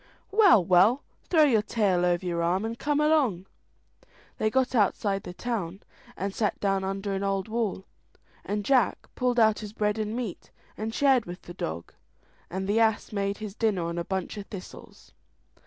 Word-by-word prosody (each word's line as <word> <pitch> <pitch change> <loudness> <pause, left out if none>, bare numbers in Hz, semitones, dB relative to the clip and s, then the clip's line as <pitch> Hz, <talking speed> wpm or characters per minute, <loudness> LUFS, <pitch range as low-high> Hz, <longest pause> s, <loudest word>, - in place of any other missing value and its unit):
"Well, 390 - +6
well, 190 +10 +4 0.3
throw 320 -3 +5
your 240 -8 +4
tail 200 -5 +1
over 175 +1 0
your 170 -1 -1
arm, 180 +5 +1
and 225 +1 -3
come 295 0 0
along." 285 - +2 0.9
They 215 - +2
got 260 +3 +1
outside 200 -3 +1
the - - -8
town, 195 -4 -4 0.3
and 195 +1 -3
sat 210 -1 -1
down 195 -1 0
under 195 +1 -3
an 195 - -2
old 195 0 -1
wall, 220 -4 -2 0.6
and 205 0 -3
Jack 255 -7 +2
pulled 250 -1 0
out 220 -1 +4
his 210 -1 -8
bread 210 0 0
and 215 +1 -2
meat, 235 -7 -5 0.3
and 220 +1 -4
shared 265 -1 +3
with 175 +1 -9
the 175 - -9
dog; 85 - -5 0.6
and 190 +2 -4
the 210 +3 +2
ass 220 -2 +1
made 200 0 -1
his 215 -2 -6
dinner 210 -5 0
on 170 +1 -3
a - - -2
bunch 190 +2 -4
of 200 - -7
thistles. 190 -3 -11
205 Hz, 180 wpm, -27 LUFS, 190-230 Hz, 0.9 s, Well